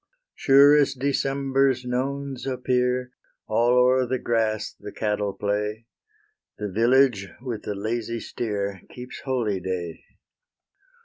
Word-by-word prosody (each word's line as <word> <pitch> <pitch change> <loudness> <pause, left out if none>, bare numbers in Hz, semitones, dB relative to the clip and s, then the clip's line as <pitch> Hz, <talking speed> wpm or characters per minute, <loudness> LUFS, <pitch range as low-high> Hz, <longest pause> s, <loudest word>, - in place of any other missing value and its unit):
Sure 140 +2 +6
as 140 -2 +3
December's 135 -1 0
nones 135 +1 -3
appear, 125 -1 0 0.3
All 120 +3 +2
o'er 125 0 +4
the 130 +2 0
grass 110 -3 -1
the - - -8
cattle 105 -1 -1
play; 105 +3 -2 0.7
The 105 -2 -4
village, 120 -1 +3
with 120 -4 -5
the 105 - -4
lazy 115 +3 -3
steer, 100 -5 -4
Keeps 125 +1 -9
holyday. 95 -9 -2
125 Hz, 110 wpm, -24 LUFS, 105-130 Hz, 0.7 s, Sure